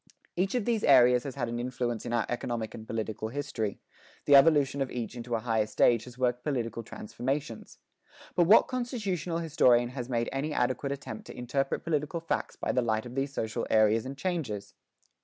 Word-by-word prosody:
Each 190 Hz, +5 st, 0 dB
of 240 Hz, -5 st, 0 dB
these 230 Hz, -3 st, 0 dB
areas 125 Hz, -2 st, +6 dB
has 135 Hz, -, -5 dB
had 125 Hz, -4 st, -2 dB
an 120 Hz, +1 st, -3 dB
influence 120 Hz, -2 st, -3 dB
in -, -, -4 dB
our 120 Hz, -2 st, +1 dB
economic 120 Hz, -2 st, -3 dB
and 110 Hz, 0 st, -9 dB
political 110 Hz, -1 st, -3 dB
history; 120 Hz, -5 st, -3 dB, 0.5 s
the 145 Hz, -, +7 dB
evolution 140 Hz, -1 st, +5 dB
of 135 Hz, -, 0 dB
each 120 Hz, -1 st, -5 dB
into 120 Hz, 0 st, -3 dB
a 115 Hz, -, -2 dB
higher 110 Hz, -2 st, +1 dB
stage 115 Hz, +1 st, +3 dB
has 125 Hz, -1 st, -12 dB
worked 125 Hz, -1 st, 0 dB
political 115 Hz, -6 st, -2 dB
transformations. 125 Hz, +3 st, -5 dB, 0.6 s
But 175 Hz, -, +3 dB
what 210 Hz, -, +7 dB
constitutional 205 Hz, -, -2 dB
historian 125 Hz, -7 st, +3 dB
has 125 Hz, -1 st, -6 dB
made 120 Hz, -2 st, 0 dB
any 145 Hz, +3 st, -2 dB
adequate 130 Hz, +2 st, 0 dB
attempt 140 Hz, +10 st, -7 dB
to -, -, -10 dB
interpret 135 Hz, +3 st, -1 dB
political 155 Hz, +1 st, -1 dB
facts 165 Hz, -, -3 dB
by -, -, -2 dB
the 125 Hz, -, +2 dB
light 110 Hz, -1 st, 0 dB
of 120 Hz, -, -8 dB
these 135 Hz, +1 st, -2 dB
social 110 Hz, -5 st, -3 dB
areas 110 Hz, 0 st, +4 dB
and 135 Hz, +1 st, -7 dB
changes? 120 Hz, -, -3 dB
125 Hz, 190 wpm, -29 LUFS, 115-145 Hz, 0.6 s, the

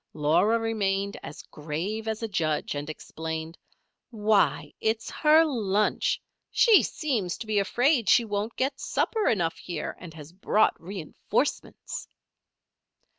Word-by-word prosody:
Laura 160 Hz, +9 st, +3 dB
remained 200 Hz, -3 st, -1 dB
as -, -, -9 dB
grave 170 Hz, +9 st, -4 dB
as 220 Hz, +1 st, -3 dB
a -, -, 0 dB
judge, 155 Hz, -7 st, -1 dB
and 145 Hz, +1 st, -5 dB
explained: 160 Hz, +1 st, -6 dB, 0.5 s
"Why, 215 Hz, -3 st, +1 dB
it's 220 Hz, 0 st, -1 dB
her 315 Hz, +1 st, +5 dB
lunch. 215 Hz, -8 st, 0 dB, 0.3 s
She 455 Hz, -4 st, +6 dB
seems 225 Hz, -, -2 dB
to -, -, -7 dB
be 215 Hz, -1 st, +1 dB
afraid 240 Hz, -, +2 dB
she 235 Hz, -, +5 dB
won't 210 Hz, +1 st, -3 dB
get 270 Hz, +1 st, -1 dB
supper 440 Hz, -2 st, 0 dB
enough 170 Hz, -7 st, 0 dB
here 170 Hz, -4 st, -5 dB
and 170 Hz, -, -9 dB
has 155 Hz, +1 st, -11 dB
brought 205 Hz, +3 st, +2 dB
reinforcements." 180 Hz, -2 st, -3 dB
205 Hz, 125 wpm, -27 LUFS, 165-225 Hz, 0.5 s, She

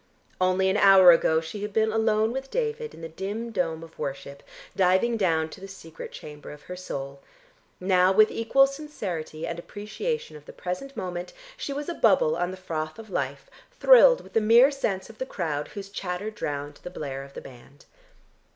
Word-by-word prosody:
Only 185 Hz, +1 st, +3 dB
an 200 Hz, -, +1 dB
hour 195 Hz, -3 st, +8 dB
ago 160 Hz, -1 st, +3 dB
she 165 Hz, +6 st, -7 dB
had 210 Hz, 0 st, -5 dB
been 220 Hz, 0 st, +2 dB
alone 220 Hz, 0 st, +2 dB
with 265 Hz, +2 st, -5 dB
David 460 Hz, -1 st, -3 dB
in -, -, -13 dB
the 165 Hz, -, -5 dB
dim 200 Hz, +8 st, -5 dB
dome 165 Hz, -5 st, -2 dB
of 165 Hz, 0 st, -15 dB
worship, 140 Hz, -1 st, -5 dB, 0.3 s
diving 190 Hz, +6 st, +3 dB
down 165 Hz, -7 st, +1 dB
to 190 Hz, -, -12 dB
the 195 Hz, -, -8 dB
secret 165 Hz, -5 st, -10 dB
chamber 150 Hz, -1 st, -10 dB
of 150 Hz, 0 st, -11 dB
her 180 Hz, -, -7 dB
soul; 140 Hz, -6 st, -6 dB, 0.6 s
now 185 Hz, 0 st, +3 dB
with 215 Hz, +2 st, +5 dB
equal 235 Hz, +4 st, +4 dB
sincerity 200 Hz, -, -5 dB
and 170 Hz, 0 st, -4 dB
appreciation 215 Hz, -, -5 dB
of 150 Hz, -1 st, -13 dB
the -, -, -10 dB
present 185 Hz, +10 st, -6 dB
moment 180 Hz, -1 st, -5 dB, 0.2 s
she 395 Hz, -, -5 dB
was 285 Hz, +1 st, -4 dB
a 345 Hz, -, -2 dB
bubble 190 Hz, -, +3 dB
on 175 Hz, +1 st, -1 dB
the 185 Hz, -, -7 dB
froth 155 Hz, -4 st, -4 dB
of 220 Hz, -2 st, -11 dB
life 140 Hz, -3 st, -3 dB, 0.3 s
thrilled -, -, +7 dB
with -, -, -16 dB
the 225 Hz, -, +3 dB
mere 235 Hz, +6 st, +6 dB
sense 200 Hz, -9 st, -2 dB
of 225 Hz, -1 st, -15 dB
the -, -, -1 dB
crowd 150 Hz, -, -3 dB
whose 200 Hz, -1 st, -8 dB
chatter 195 Hz, +1 st, -4 dB
drowned 145 Hz, -7 st, -5 dB
the -, -, -7 dB
blare 140 Hz, -6 st, -6 dB
of 140 Hz, 0 st, -14 dB
the -, -, -5 dB
band. 135 Hz, +2 st, -15 dB
185 Hz, 195 wpm, -26 LUFS, 160-220 Hz, 0.6 s, hour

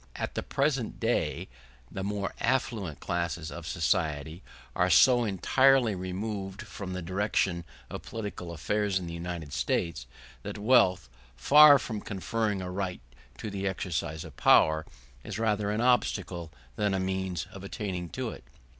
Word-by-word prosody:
At -, -, -4 dB
the -, -, -2 dB
present 135 Hz, -4 st, -1 dB
day -, -, 0 dB, 0.4 s
the 95 Hz, -, -4 dB
more 100 Hz, -1 st, -2 dB
affluent 115 Hz, -, -1 dB
classes 85 Hz, -1 st, -3 dB
of 85 Hz, -2 st, -8 dB
society 80 Hz, -2 st, -1 dB, 0.3 s
are 90 Hz, +1 st, +2 dB
so 120 Hz, -, +6 dB
entirely 120 Hz, +5 st, +3 dB
removed 95 Hz, +1 st, -4 dB
from 95 Hz, -2 st, -7 dB
the 90 Hz, -1 st, -4 dB
direction 95 Hz, -1 st, 0 dB, 0.2 s
of -, -, -7 dB
political 105 Hz, -6 st, -6 dB
affairs 100 Hz, +5 st, 0 dB
in 90 Hz, -, -4 dB
the 85 Hz, -, -6 dB
United 85 Hz, -3 st, -5 dB
States 80 Hz, -8 st, -1 dB, 0.3 s
that -, -, -6 dB
wealth, 100 Hz, -, +4 dB, 0.3 s
far 145 Hz, -, +8 dB
from 110 Hz, -3 st, -5 dB
conferring 105 Hz, 0 st, -2 dB
a 90 Hz, -, -5 dB
right 95 Hz, -1 st, -3 dB, 0.4 s
to 110 Hz, -, -5 dB
the 100 Hz, 0 st, -2 dB
exercise 85 Hz, -4 st, -3 dB
of 80 Hz, -5 st, -12 dB
power, 80 Hz, 0 st, +4 dB, 0.4 s
is -, -, -5 dB
rather 105 Hz, -2 st, 0 dB
an 105 Hz, +2 st, 0 dB
obstacle 95 Hz, -9 st, +1 dB, 0.3 s
than 100 Hz, -2 st, +1 dB
a -, -, 0 dB
means 95 Hz, -3 st, -2 dB
of 100 Hz, -, -10 dB
attaining 95 Hz, -3 st, -4 dB
to -, -, -4 dB
it. -, -, -11 dB
95 Hz, 150 wpm, -29 LUFS, 85-105 Hz, 0.4 s, far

